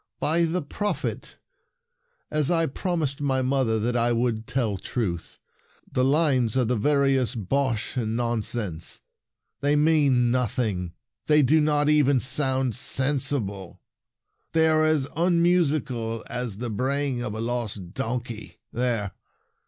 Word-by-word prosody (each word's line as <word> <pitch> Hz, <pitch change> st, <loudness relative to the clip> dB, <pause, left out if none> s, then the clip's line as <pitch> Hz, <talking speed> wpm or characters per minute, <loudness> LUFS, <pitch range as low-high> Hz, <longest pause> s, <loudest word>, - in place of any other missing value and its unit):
"By 165 Hz, +2 st, +2 dB
the 165 Hz, +1 st, -1 dB
Prophet, 205 Hz, +8 st, -4 dB, 0.9 s
as 150 Hz, -2 st, +2 dB
I 165 Hz, -2 st, +3 dB
prom 175 Hz, +4 st, -2 dB
ised 140 Hz, -1 st, -2 dB
my 135 Hz, -2 st, +1 dB
mother 130 Hz, -4 st, +1 dB
that 120 Hz, +3 st, -1 dB
I 120 Hz, 0 st, +2 dB
would 115 Hz, -2 st, -1 dB
tell 120 Hz, -6 st, -1 dB
truth, 95 Hz, -6 st, -4 dB, 0.5 s
the 130 Hz, -, +1 dB
lines 135 Hz, -5 st, +2 dB
are 125 Hz, -, +3 dB
the 125 Hz, +2 st, 0 dB
veriest 130 Hz, -4 st, +1 dB
bosh 130 Hz, -3 st, -1 dB
and 115 Hz, -2 st, -1 dB
nonsense! 110 Hz, -7 st, -2 dB, 0.6 s
They 145 Hz, +1 st, +2 dB
mean 145 Hz, -6 st, +3 dB
nothing. 110 Hz, -8 st, -1 dB, 0.3 s
They 150 Hz, -1 st, +5 dB
do 155 Hz, +5 st, +4 dB
not 150 Hz, -1 st, +2 dB
even 145 Hz, -3 st, +4 dB
sound 130 Hz, -1 st, 0 dB
sensible. 130 Hz, -8 st, -1 dB, 0.7 s
They 160 Hz, 0 st, +4 dB
are 155 Hz, 0 st, +3 dB
as 155 Hz, -4 st, +2 dB
unmusical 155 Hz, -9 st, +1 dB
as 120 Hz, -4 st, -4 dB
the 120 Hz, 0 st, -4 dB
bray 135 Hz, +6 st, 0 dB
ing 125 Hz, -2 st, -3 dB
of 110 Hz, -3 st, -4 dB
a -, -, -5 dB
lost 110 Hz, -6 st, -3 dB
donkey! 120 Hz, -1 st, -5 dB, 0.2 s
There! 115 Hz, -5 st, -1 dB
130 Hz, 135 wpm, -25 LUFS, 115-145 Hz, 0.9 s, They